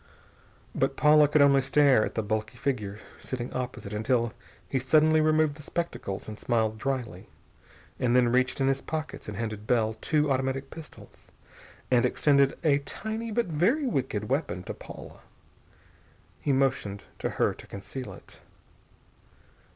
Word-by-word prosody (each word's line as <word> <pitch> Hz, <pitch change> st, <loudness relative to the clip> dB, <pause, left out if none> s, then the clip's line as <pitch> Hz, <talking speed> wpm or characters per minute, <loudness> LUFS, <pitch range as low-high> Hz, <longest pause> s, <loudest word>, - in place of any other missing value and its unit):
But -, -, 0 dB
Paula 150 Hz, 0 st, +6 dB
could 145 Hz, 0 st, +4 dB
only 140 Hz, -1 st, +5 dB
stare 135 Hz, -3 st, +4 dB
at -, -, -4 dB
the 110 Hz, -, 0 dB
bulky 110 Hz, +1 st, -3 dB
figure 110 Hz, -8 st, -2 dB, 0.2 s
sitting 125 Hz, -1 st, -5 dB
opposite 125 Hz, -5 st, -5 dB
until 115 Hz, +1 st, 0 dB, 0.3 s
he 135 Hz, -, 0 dB
suddenly 155 Hz, +4 st, +4 dB
removed 155 Hz, -1 st, +2 dB
the -, -, -10 dB
spectacles, 150 Hz, -, -4 dB
and 110 Hz, -1 st, -8 dB
smiled 110 Hz, -2 st, 0 dB
dryly, 125 Hz, -9 st, -3 dB, 0.7 s
and 125 Hz, -1 st, +2 dB
then 125 Hz, -1 st, +5 dB
reached 130 Hz, +2 st, +1 dB
in 135 Hz, -, +2 dB
his 135 Hz, 0 st, +1 dB
pockets 155 Hz, -1 st, -5 dB
and 105 Hz, -, -6 dB
handed 110 Hz, -1 st, -4 dB
Bell 110 Hz, -2 st, +2 dB
two 150 Hz, -2 st, +1 dB
automatic 135 Hz, +1 st, -1 dB
pistols, 160 Hz, -2 st, -13 dB, 0.6 s
and 125 Hz, -2 st, +4 dB
extended 140 Hz, +2 st, +3 dB
a 145 Hz, -3 st, +4 dB
tiny 220 Hz, +10 st, -5 dB
but 235 Hz, +2 st, 0 dB
very 190 Hz, -, +1 dB
wicked 130 Hz, -, -1 dB
weapon 125 Hz, -, -1 dB
to -, -, -5 dB
Paula. -, -, -11 dB, 1.2 s
He 145 Hz, -, 0 dB
motioned 130 Hz, -7 st, 0 dB, 0.2 s
to -, -, -1 dB
her -, -, +2 dB
to -, -, -13 dB
conceal 125 Hz, +6 st, -7 dB
it. -, -, -14 dB
135 Hz, 150 wpm, -28 LUFS, 115-150 Hz, 1.2 s, Paula